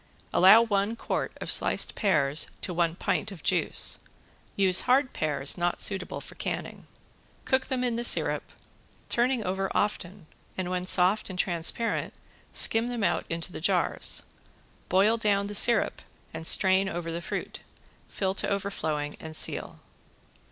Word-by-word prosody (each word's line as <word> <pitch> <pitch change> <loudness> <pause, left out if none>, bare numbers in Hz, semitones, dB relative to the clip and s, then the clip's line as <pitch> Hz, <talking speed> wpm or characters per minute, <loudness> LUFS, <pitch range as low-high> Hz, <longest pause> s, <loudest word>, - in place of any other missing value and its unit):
Allow 195 +5 +7
one 205 0 -1
quart - - -3
of - - -4
sliced - - +2
pears 150 -8 +1
to 180 - -3
one 170 -1 0
pint 200 - -2
of 180 -6 -11
juice. - - +2 0.6
Use 190 -2 +5
hard 260 +1 +2
pears 145 +1 -1
not 175 0 -1
suitable 190 -2 0
for - - -11
canning. - - -6 0.6
Cook 260 0 0
them 255 -1 -2
in 240 -2 -1
the 240 - -2
syrup, - - 0 0.6
turning 245 -1 +1
over 190 +1 -2
often 195 -3 -2 0.3
and 185 -1 -3
when 180 0 -2
soft 185 +4 +2
and 185 - -7
transparent 180 +6 -1 0.4
skim 225 +1 +2
them 240 -3 -4
out - - 0
into 165 +2 -4
the - - -7
jars. 180 0 +1 0.7
Boil 200 +5 +3
down 205 -3 0
the 205 - -6
syrup 225 +2 +3 0.3
and 160 0 -3
strain 190 0 +4
over 170 -2 -5
the 170 +1 -5
fruit. - - -6 0.5
Fill 190 -1 -2
to - - -1
overflowing 160 -7 -3
and 160 0 -6
seal. - - 0
190 Hz, 150 wpm, -27 LUFS, 175-215 Hz, 0.7 s, Allow